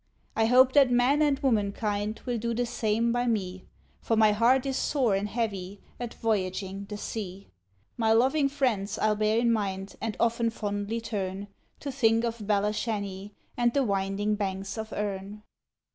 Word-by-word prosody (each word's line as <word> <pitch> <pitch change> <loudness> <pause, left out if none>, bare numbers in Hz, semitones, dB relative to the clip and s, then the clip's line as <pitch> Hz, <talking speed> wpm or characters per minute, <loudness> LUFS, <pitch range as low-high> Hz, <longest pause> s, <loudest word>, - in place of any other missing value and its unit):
I 225 - +3
hope 255 +2 +6
that 280 -3 +6
man 250 +4 +3
and 290 -2 +3
womankind 210 -4 -1
will 245 -2 -1
do 235 +1 -2
the 245 +1 0
same 230 0 0
by 245 +1 0
me; 190 -5 -2 0.4
For 225 - 0
my 215 -1 +5
heart 240 +5 +3
is 270 -1 -1
sore 260 -6 +1
and 200 +2 -1
heavy 200 -4 -3 0.2
at 240 -2 -5
voyaging 195 -2 -2
the 210 - -5
sea. 195 - -6 0.5
My 225 -2 +2
loving 270 +5 +3
friends 235 -8 -1
I'll 215 0 +2
bear 215 +1 +1
in 235 0 +3
mind, 195 -2 -3
and 225 -2 -3
often 235 0 +2
fondly 205 +1 -3
turn 200 -2 -4 0.3
To 280 - -4
think 230 -3 +2
of 230 0 -2
Belashanny, 205 -1 -1 0.2
and 240 +1 +1
the 280 - +3
winding 200 0 0
banks 195 -1 -3
of 220 -1 -6
Erne. 205 0 -4
220 Hz, 165 wpm, -28 LUFS, 200-235 Hz, 0.5 s, hope